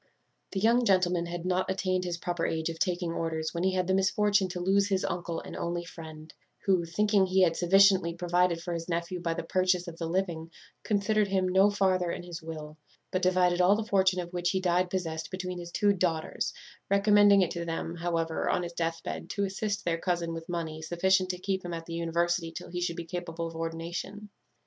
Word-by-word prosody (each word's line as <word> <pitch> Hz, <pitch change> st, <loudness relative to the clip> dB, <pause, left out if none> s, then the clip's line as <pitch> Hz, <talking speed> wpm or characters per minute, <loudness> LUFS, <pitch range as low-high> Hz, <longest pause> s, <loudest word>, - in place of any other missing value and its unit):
"The 195 Hz, -, -1 dB
young 230 Hz, +4 st, +4 dB
gentleman 180 Hz, -4 st, +2 dB
had 175 Hz, 0 st, -5 dB
not 185 Hz, 0 st, 0 dB
attained 185 Hz, -1 st, 0 dB
his 175 Hz, -1 st, -2 dB
proper 175 Hz, -1 st, -3 dB
age 160 Hz, 0 st, -1 dB
of 165 Hz, -1 st, -6 dB
taking 175 Hz, -2 st, 0 dB
orders 160 Hz, -1 st, -2 dB
when 170 Hz, 0 st, -2 dB
he 190 Hz, 0 st, +2 dB
had 185 Hz, -1 st, +1 dB
the 190 Hz, -, +1 dB
misfortune 195 Hz, +1 st, +2 dB
to 180 Hz, 0 st, -5 dB
lose 195 Hz, +2 st, +2 dB
his 190 Hz, -2 st, 0 dB
uncle 170 Hz, -1 st, -3 dB
and -, -, -9 dB
only 170 Hz, 0 st, -3 dB
friend, 160 Hz, -2 st, -10 dB, 0.3 s
who, 185 Hz, -3 st, +3 dB
thinking 205 Hz, +3 st, +2 dB
he 185 Hz, +1 st, +4 dB
had 165 Hz, -2 st, +3 dB
sufficiently 190 Hz, -1 st, +4 dB
provided 175 Hz, -1 st, +1 dB
for 175 Hz, -, -3 dB
his 165 Hz, +1 st, -5 dB
nephew 170 Hz, +1 st, -2 dB
by 165 Hz, -1 st, -2 dB
the -, -, -3 dB
purchase 180 Hz, +1 st, +1 dB
of 165 Hz, -1 st, -8 dB
the 165 Hz, -, -2 dB
living, 170 Hz, -2 st, -2 dB, 0.3 s
considered 210 Hz, 0 st, +1 dB
him 190 Hz, -1 st, +1 dB
no 190 Hz, +2 st, +5 dB
farther 190 Hz, -3 st, +1 dB
in 175 Hz, -, -4 dB
his 175 Hz, -1 st, -7 dB
will, 155 Hz, -1 st, -8 dB, 0.3 s
but 185 Hz, -, 0 dB
divided 180 Hz, -1 st, +3 dB
all 185 Hz, +3 st, +5 dB
the 220 Hz, 0 st, -2 dB
fortune 190 Hz, -3 st, +2 dB
of 175 Hz, 0 st, -6 dB
which 175 Hz, 0 st, 0 dB
he 190 Hz, -, +1 dB
died 180 Hz, 0 st, +1 dB
possessed 165 Hz, -4 st, -3 dB
between 185 Hz, -1 st, -4 dB
his 175 Hz, 0 st, -7 dB
two 205 Hz, +2 st, +3 dB
daughters; 170 Hz, -4 st, -1 dB, 0.4 s
recommending 200 Hz, 0 st, +6 dB
it 180 Hz, -, -2 dB
to 170 Hz, -, -3 dB
them, 165 Hz, 0 st, -3 dB
however, 165 Hz, -1 st, -1 dB
on 180 Hz, -, +1 dB
his 170 Hz, 0 st, -6 dB
deathbed, 165 Hz, -1 st, -3 dB
to 200 Hz, -, -1 dB
assist 200 Hz, +1 st, -2 dB
their 165 Hz, -1 st, 0 dB
cousin 170 Hz, -2 st, -1 dB
with 165 Hz, 0 st, -7 dB
money 160 Hz, -2 st, -3 dB
sufficient 185 Hz, +3 st, +2 dB
to 180 Hz, -, -2 dB
keep 190 Hz, +1 st, -2 dB
him 175 Hz, -1 st, -4 dB
at 165 Hz, 0 st, -7 dB
the 165 Hz, -, -7 dB
university 170 Hz, 0 st, 0 dB
till -, -, -8 dB
he 175 Hz, 0 st, -3 dB
should 170 Hz, -1 st, -1 dB
be 170 Hz, -, -5 dB
capable 170 Hz, -1 st, -4 dB
of 165 Hz, 0 st, -7 dB
ordination. 170 Hz, +5 st, -5 dB
175 Hz, 215 wpm, -29 LUFS, 170-190 Hz, 0.4 s, recommending